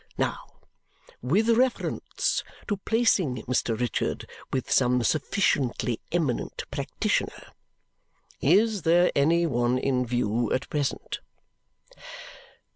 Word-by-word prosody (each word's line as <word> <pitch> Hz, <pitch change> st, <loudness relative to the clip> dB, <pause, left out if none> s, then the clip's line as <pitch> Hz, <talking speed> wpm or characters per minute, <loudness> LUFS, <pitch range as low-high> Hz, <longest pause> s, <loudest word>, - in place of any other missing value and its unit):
Now, -, -, -3 dB, 0.6 s
with 185 Hz, -, +2 dB
reference 255 Hz, -, 0 dB, 0.2 s
to 205 Hz, -, -1 dB
placing 195 Hz, -, +2 dB
Mr. 120 Hz, -2 st, -1 dB
Richard 120 Hz, -3 st, -2 dB, 0.2 s
with 130 Hz, -, -2 dB
some 125 Hz, -1 st, +3 dB
sufficiently 135 Hz, -, 0 dB
eminent 155 Hz, -8 st, -1 dB
practitioner. -, -, -2 dB, 0.9 s
Is 205 Hz, +6 st, +3 dB
there 175 Hz, +3 st, +4 dB
any 165 Hz, +4 st, +3 dB
one 120 Hz, -4 st, +1 dB
in 130 Hz, -1 st, +1 dB
view 120 Hz, -1 st, 0 dB
at 130 Hz, -, -1 dB
present?" 145 Hz, -3 st, -2 dB
140 Hz, 95 wpm, -26 LUFS, 125-185 Hz, 0.9 s, there